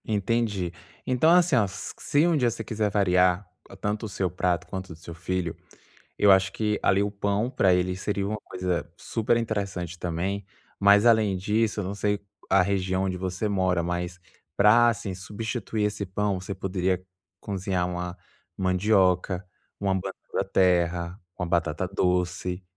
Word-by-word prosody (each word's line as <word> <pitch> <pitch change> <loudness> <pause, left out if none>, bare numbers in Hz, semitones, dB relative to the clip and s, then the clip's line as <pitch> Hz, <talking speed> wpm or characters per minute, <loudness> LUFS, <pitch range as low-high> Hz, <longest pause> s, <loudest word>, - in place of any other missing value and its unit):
Entendi. 105 -3 0 0.3
Então, 130 +5 +3
assim, 175 -4 +5
ó, 110 -4 +4
se 145 - -1
um 170 - +3
dia 125 -5 +3
você 115 - -5
quiser 110 -2 -1
variar 90 -1 +3 0.3
tanto 105 +3 -2
o - - -9
seu 95 -2 -1
prato 90 -2 0
quanto 95 0 -5
o - - -7
do - - -12
seu 85 0 -9
filho, 85 0 -3 0.6
eu 100 - +6
acho 95 0 +4
que 105 -1 0 0.2
o 100 - -2
pão, 100 +3 0
para 95 -8 +3
ele, 90 0 +1
seria 100 +1 -2
uma 105 +2 -2
coisa 90 -1 -2
superinteressante 100 -7 -1
também. 90 +4 -2 0.3
Mas, 100 +2 +6
além 110 -4 +4
disso, 105 +3 0
eu - - -4
não 95 +2 -3
sei 105 0 0 0.3
a 95 0 +5
região 95 0 0
onde 95 -1 -1
você 95 +3 -2
mora, 95 -3 +1
mas, 90 +1 -3 0.4
para 115 +5 +6
substituir 105 +3 -4
esse 105 -1 -2
pão 100 +1 -1
você 95 +2 -6
poderia 95 -1 -1 0.4
cozinhar 95 -2 -1
uma 90 0 -4 0.4
mandioca, 95 -1 +2 0.3
uma 100 -1 +1
banana-da-terra, 90 -2 0 0.2
uma 90 - -2
batata-doce, 90 +2 -1
95 Hz, 150 wpm, -26 LUFS, 90-105 Hz, 0.6 s, eu